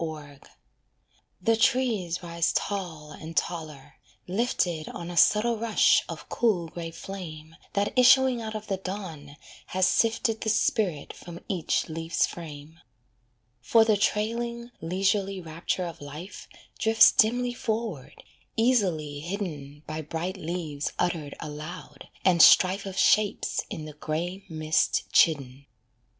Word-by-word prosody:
COROT 150 Hz, -3 st, -8 dB, 0.9 s
The 225 Hz, 0 st, +2 dB
trees 220 Hz, -8 st, +1 dB
rise 170 Hz, -1 st, 0 dB
tall 170 Hz, -7 st, -3 dB
and 160 Hz, +2 st, -9 dB
taller, 155 Hz, -5 st, -3 dB, 0.3 s
lifted 180 Hz, -6 st, -1 dB
On 170 Hz, 0 st, -7 dB
a -, -, -7 dB
subtle 220 Hz, +7 st, +4 dB
rush 225 Hz, -1 st, +4 dB
of -, -, -7 dB
cool 185 Hz, -8 st, 0 dB
grey 165 Hz, 0 st, -6 dB
flame 165 Hz, -3 st, -9 dB, 0.2 s
That 200 Hz, 0 st, 0 dB
issuing 255 Hz, -1 st, +5 dB
out 220 Hz, -1 st, -5 dB
of 215 Hz, 0 st, -5 dB
the 195 Hz, -3 st, -2 dB
dawn 175 Hz, -7 st, -7 dB, 0.3 s
has 185 Hz, 0 st, +1 dB
sifted 225 Hz, +2 st, +1 dB
The 220 Hz, -, -1 dB
spirit 195 Hz, -7 st, 0 dB
from 170 Hz, -1 st, -10 dB
each 180 Hz, -5 st, -1 dB
leaf's 165 Hz, +1 st, 0 dB
frame. 160 Hz, -1 st, -9 dB, 0.8 s
For 225 Hz, -1 st, +4 dB
the 220 Hz, -1 st, +4 dB
trailing, 235 Hz, +4 st, -1 dB
leisurely 195 Hz, +3 st, 0 dB
rapture 170 Hz, +2 st, -3 dB
of 170 Hz, -3 st, -8 dB
life 150 Hz, +7 st, -9 dB, 0.3 s
Drifts 225 Hz, 0 st, +6 dB
dimly 245 Hz, +3 st, +2 dB
forward, 220 Hz, -, -4 dB, 0.3 s
easily 185 Hz, -, +1 dB
hidden 150 Hz, -5 st, -6 dB
By 155 Hz, +1 st, -4 dB
bright 165 Hz, +5 st, -4 dB
leaves 160 Hz, -5 st, -4 dB
uttered 160 Hz, -5 st, -1 dB
aloud, 155 Hz, +2 st, -8 dB, 0.2 s
and 175 Hz, -3 st, +5 dB
strife 190 Hz, +2 st, +6 dB
Of 190 Hz, -1 st, -7 dB
shapes 210 Hz, -1 st, +2 dB
in 155 Hz, -, -6 dB
the 155 Hz, -, -9 dB
grey 170 Hz, +6 st, -4 dB
mist 155 Hz, -1 st, +1 dB
chidden. 140 Hz, -3 st, +2 dB
175 Hz, 130 wpm, -27 LUFS, 155-210 Hz, 0.9 s, Drifts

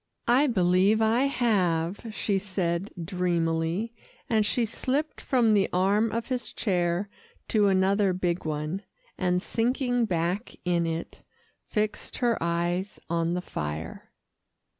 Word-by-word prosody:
"I 260 Hz, +5 st, +5 dB
believe 190 Hz, -1 st, +3 dB
I 225 Hz, +4 st, +3 dB
have," 195 Hz, -8 st, +1 dB
she 200 Hz, -1 st, 0 dB
said 185 Hz, -1 st, -2 dB
dreamily, 170 Hz, +2 st, 0 dB, 0.4 s
and 220 Hz, -2 st, +3 dB
she 240 Hz, +1 st, +1 dB
slipped 270 Hz, +7 st, -2 dB
from 240 Hz, -5 st, +3 dB
the 200 Hz, -2 st, +3 dB
arm 200 Hz, +5 st, +2 dB
of 230 Hz, +1 st, -2 dB
his 250 Hz, -2 st, -2 dB
chair 180 Hz, -1 st, 0 dB, 0.4 s
to 210 Hz, -2 st, +4 dB
another 195 Hz, +1 st, +3 dB
big 180 Hz, -1 st, -1 dB
one, 155 Hz, +4 st, -3 dB, 0.3 s
and 180 Hz, 0 st, 0 dB
sinking 245 Hz, +1 st, +1 dB
back 180 Hz, +3 st, -1 dB
in 170 Hz, -1 st, +1 dB
it, 165 Hz, 0 st, -5 dB, 0.5 s
fixed 215 Hz, 0 st, -2 dB
her 240 Hz, -2 st, +1 dB
eyes 175 Hz, +3 st, -1 dB
on 170 Hz, 0 st, +1 dB
the 180 Hz, -, -3 dB
fire. 75 Hz, -, -5 dB
190 Hz, 125 wpm, -27 LUFS, 170-225 Hz, 0.5 s, I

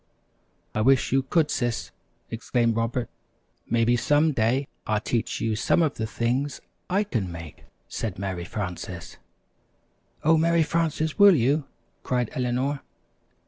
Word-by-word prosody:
"I 110 Hz, -, 0 dB
wish 130 Hz, +2 st, +3 dB
you 135 Hz, +1 st, +4 dB
could, 150 Hz, +3 st, +1 dB
Sis," 120 Hz, -2 st, -1 dB, 0.4 s
exclaimed 115 Hz, 0 st, 0 dB
Robert. 115 Hz, +2 st, -1 dB, 0.6 s
"Maybe 115 Hz, +1 st, +3 dB
some 145 Hz, +6 st, +3 dB
day 130 Hz, +2 st, +1 dB, 0.2 s
I'll 110 Hz, -1 st, +2 dB
teach 115 Hz, +1 st, -2 dB
you 110 Hz, -1 st, 0 dB
some 125 Hz, +9 st, +2 dB
of 150 Hz, -3 st, +1 dB
the 110 Hz, -, -2 dB
things 125 Hz, +5 st, -1 dB, 0.3 s
I 195 Hz, +3 st, +2 dB
can 110 Hz, -, -2 dB
make," 80 Hz, -3 st, -9 dB, 0.2 s
said 110 Hz, -5 st, -4 dB
Mary 95 Hz, -3 st, -3 dB
Frances. 90 Hz, -3 st, -6 dB, 1.1 s
"Oh, 160 Hz, +1 st, +5 dB
Mary 165 Hz, +1 st, +3 dB
Frances, 160 Hz, +1 st, -1 dB
will 200 Hz, -2 st, +9 dB
you?" 140 Hz, +3 st, +2 dB, 0.4 s
cried 125 Hz, -3 st, -1 dB
Eleanor. 130 Hz, +3 st, -1 dB
125 Hz, 135 wpm, -25 LUFS, 110-150 Hz, 1.1 s, will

